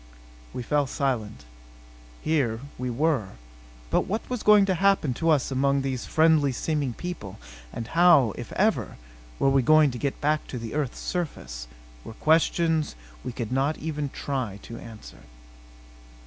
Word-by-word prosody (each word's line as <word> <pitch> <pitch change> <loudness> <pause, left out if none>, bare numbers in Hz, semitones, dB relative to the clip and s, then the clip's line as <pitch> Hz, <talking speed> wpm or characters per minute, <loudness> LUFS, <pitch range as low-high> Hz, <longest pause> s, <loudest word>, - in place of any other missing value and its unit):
We 125 - -5
fell 145 +3 +1
silent. 130 - -2 0.8
Here 130 -8 0 0.2
we 125 0 -2
were. 130 -4 0 0.6
But - - +2
what 215 +4 -3
was 250 -3 -2
going 210 -1 +6
to 190 - +1
happen 190 -7 +2
to 165 +7 -1
us 145 -4 +2
among 140 +1 +1
these 130 -2 -3
friendly 155 -3 +4
seeming 145 -1 -1
people; 175 - -7 0.3
and 115 - -5
how 165 - +5
if - - -8
ever - - 0 0.4
we 135 - +3
were 135 0 +4
going 155 +1 +5
to 120 - -7
get 140 +1 -2
back 150 +1 0
to 125 - -6
the 115 -2 -6
earth's 145 -4 -2
surface, - - -4 0.4
were - - -9
questions 160 0 +2 0.3
we - - -4
could 120 -1 -5
not 135 +4 +1
even 150 -2 -3
try 130 -8 -4
to 115 0 -8
answer. 110 -2 -12
140 Hz, 155 wpm, -26 LUFS, 125-160 Hz, 0.8 s, going